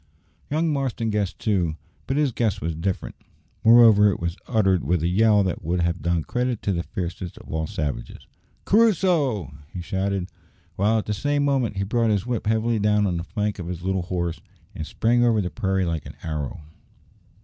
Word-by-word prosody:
Young 155 Hz, +1 st, +1 dB
Marston 130 Hz, -5 st, -1 dB
guessed 105 Hz, -3 st, -1 dB
too, 90 Hz, -7 st, 0 dB, 0.3 s
but 135 Hz, -, 0 dB
his 150 Hz, -3 st, +2 dB
guess 115 Hz, -4 st, 0 dB
was 80 Hz, 0 st, -2 dB
different. 90 Hz, +4 st, -3 dB, 0.5 s
Moreover, 110 Hz, -3 st, +7 dB
it 100 Hz, -, -2 dB
was 85 Hz, 0 st, -2 dB
uttered 95 Hz, -6 st, +2 dB
with 85 Hz, +3 st, 0 dB
a -, -, +2 dB
yell 105 Hz, +2 st, +4 dB
that 90 Hz, -2 st, -3 dB
would 85 Hz, +2 st, 0 dB
have 85 Hz, -1 st, -1 dB
done 85 Hz, 0 st, 0 dB
credit 125 Hz, +2 st, -2 dB
to 100 Hz, -, 0 dB
the 85 Hz, -, -1 dB
fiercest 90 Hz, 0 st, -5 dB
of -, -, -12 dB
all 80 Hz, 0 st, -1 dB
the -, -, -10 dB
savages. 75 Hz, -11 st, -4 dB, 0.4 s
"Crusoe!" 170 Hz, -, +2 dB, 0.2 s
he 90 Hz, -, -6 dB
shouted, 95 Hz, 0 st, -2 dB, 0.5 s
while 105 Hz, +4 st, +2 dB
at 110 Hz, -, -2 dB
the 105 Hz, -, -1 dB
same 145 Hz, +7 st, 0 dB
moment 130 Hz, -7 st, 0 dB
he 100 Hz, -, 0 dB
brought 115 Hz, +3 st, +1 dB
his 105 Hz, -1 st, +1 dB
whip 120 Hz, -4 st, -2 dB
heavily 110 Hz, +1 st, +1 dB
down 105 Hz, 0 st, +2 dB
on 90 Hz, -3 st, 0 dB
the 85 Hz, -, -3 dB
flank 105 Hz, +4 st, -3 dB
of 85 Hz, -, -5 dB
his 90 Hz, -1 st, -5 dB
little 95 Hz, 0 st, 0 dB
horse, 85 Hz, -2 st, -3 dB, 0.3 s
and 80 Hz, -, -6 dB
sprang 120 Hz, +2 st, +2 dB
over 115 Hz, -2 st, +3 dB
the 90 Hz, -3 st, -2 dB
prairie 95 Hz, -4 st, 0 dB
like 85 Hz, -3 st, -3 dB
an -, -, -10 dB
arrow. 75 Hz, -3 st, -4 dB
100 Hz, 195 wpm, -24 LUFS, 85-115 Hz, 0.5 s, Moreover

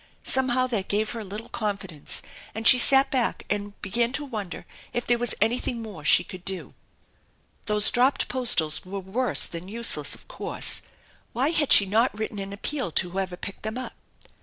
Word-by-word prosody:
Somehow 255 Hz, -1 st, +1 dB
that 225 Hz, -7 st, -3 dB
gave 215 Hz, +2 st, -1 dB
her 235 Hz, -, -6 dB
a -, -, -6 dB
little 210 Hz, +4 st, -8 dB
confidence 195 Hz, -9 st, -3 dB, 0.3 s
and 220 Hz, 0 st, +1 dB
she 250 Hz, -, +9 dB
sat 270 Hz, +2 st, +6 dB
back 255 Hz, -3 st, -1 dB
and 205 Hz, 0 st, -4 dB
began 235 Hz, +4 st, +1 dB
to 290 Hz, -, 0 dB
wonder 205 Hz, -10 st, -6 dB, 0.3 s
if 240 Hz, -, -3 dB
there 240 Hz, -1 st, +1 dB
was 240 Hz, 0 st, -1 dB
anything 235 Hz, +2 st, 0 dB
more 210 Hz, -9 st, -9 dB
she 175 Hz, -, +5 dB
could 185 Hz, 0 st, -11 dB
do. 190 Hz, -1 st, -5 dB, 0.9 s
Those 210 Hz, -1 st, +3 dB
dropped 255 Hz, +3 st, +2 dB
postals 220 Hz, -12 st, +1 dB
were 195 Hz, +2 st, -6 dB
worse 220 Hz, +7 st, +2 dB
than 170 Hz, +2 st, -6 dB
useless, 230 Hz, +3 st, +1 dB
of -, -, -18 dB
course. -, -, 0 dB, 0.5 s
Why 265 Hz, +6 st, +1 dB
had 305 Hz, -4 st, +2 dB
she 200 Hz, -, +8 dB
not 215 Hz, +3 st, +1 dB
written 215 Hz, -1 st, -5 dB
an 195 Hz, 0 st, -6 dB
appeal 250 Hz, +3 st, -3 dB
to 180 Hz, -2 st, 0 dB
whoever 185 Hz, -1 st, -4 dB
picked 200 Hz, -, -8 dB
them 220 Hz, +2 st, -5 dB
up? 255 Hz, -, -6 dB
220 Hz, 185 wpm, -25 LUFS, 195-245 Hz, 0.9 s, she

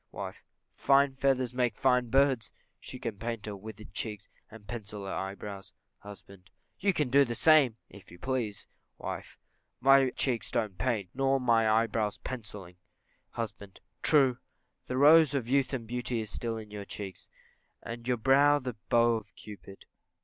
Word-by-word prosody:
Wife. -, -, -7 dB, 0.3 s
Fine 140 Hz, 0 st, +3 dB
feathers 130 Hz, -3 st, +1 dB
make 125 Hz, -1 st, 0 dB
fine 125 Hz, -2 st, +2 dB
birds; 135 Hz, -2 st, +2 dB, 0.3 s
she 130 Hz, -, -8 dB
can 115 Hz, -5 st, -5 dB
paint 115 Hz, -1 st, -4 dB
her 105 Hz, -1 st, -5 dB
withered 105 Hz, -1 st, -11 dB
cheeks, 105 Hz, -1 st, -4 dB, 0.2 s
and 110 Hz, -2 st, -14 dB
pencil 105 Hz, -3 st, -6 dB
her 95 Hz, -, -4 dB
eyebrows. 100 Hz, 0 st, -6 dB, 0.3 s
Husband. 100 Hz, -2 st, -13 dB, 0.3 s
You 200 Hz, +1 st, +2 dB
can 150 Hz, -7 st, -1 dB
do 140 Hz, +3 st, +6 dB
the 120 Hz, -3 st, -3 dB
same, 145 Hz, -7 st, +5 dB
if 100 Hz, -, -15 dB
you 85 Hz, -, -13 dB
please. 120 Hz, -4 st, -3 dB, 0.3 s
Wife. -, -, -7 dB, 0.4 s
My 135 Hz, 0 st, +5 dB
cheeks 125 Hz, -2 st, -1 dB
don't 110 Hz, -3 st, -1 dB
want 90 Hz, -, -27 dB
paint, 110 Hz, -8 st, -1 dB
nor 135 Hz, +1 st, +1 dB
my 115 Hz, -3 st, +3 dB
eyebrows 110 Hz, -1 st, +1 dB
pencilling. 105 Hz, -7 st, -8 dB, 0.6 s
Husband. 100 Hz, -4 st, -6 dB, 0.2 s
True; 135 Hz, -5 st, +4 dB, 0.5 s
the 130 Hz, -, -3 dB
rose 150 Hz, +1 st, +6 dB
of 125 Hz, -4 st, -1 dB
youth 135 Hz, 0 st, +2 dB
and 125 Hz, -4 st, -4 dB
beauty 120 Hz, +1 st, -3 dB
is 110 Hz, -1 st, -5 dB
still 115 Hz, -1 st, -3 dB
on 110 Hz, -2 st, -8 dB
your 105 Hz, -1 st, -7 dB
cheeks, 100 Hz, -2 st, -8 dB, 0.6 s
and 115 Hz, +1 st, -7 dB
your 125 Hz, -1 st, +1 dB
brow 140 Hz, +5 st, +5 dB
the 125 Hz, -4 st, -5 dB
bow 120 Hz, -1 st, +4 dB
of 110 Hz, -, -11 dB
Cupid. 100 Hz, -2 st, -12 dB
115 Hz, 165 wpm, -30 LUFS, 105-130 Hz, 0.6 s, do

